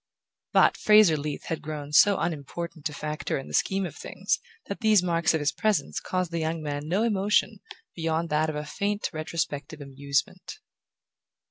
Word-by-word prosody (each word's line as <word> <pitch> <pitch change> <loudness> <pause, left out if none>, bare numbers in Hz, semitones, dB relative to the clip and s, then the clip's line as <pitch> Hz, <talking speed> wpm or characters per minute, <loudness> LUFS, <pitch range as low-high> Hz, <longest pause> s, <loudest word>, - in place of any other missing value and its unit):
But - - +4
Fraser 210 -6 +6
Leath 150 0 -4
had 165 - -4
grown 150 -1 -6
so 200 +6 +6
unimportant 165 0 -4
a - - -10
factor 150 +1 -3
in 135 - -7
the - - -10
scheme 195 0 +1
of - - -7
things - - -2 0.3
that 200 - -5
these 215 -5 +4
marks 170 -2 +2
of - - +1
his 145 0 +1
presence 215 +6 0
caused 185 -2 -2
the 170 - -2
young 160 +1 -1
man 145 0 -4
no 190 +7 +1
emotion 210 -1 +1 0.4
beyond 165 0 -1
that 155 +1 +1
of 155 - -4
a 150 0 -4
faint 205 +6 -2
retrospective 155 -2 -3
amusement. 140 0 -3
160 Hz, 170 wpm, -27 LUFS, 150-190 Hz, 0.4 s, Fraser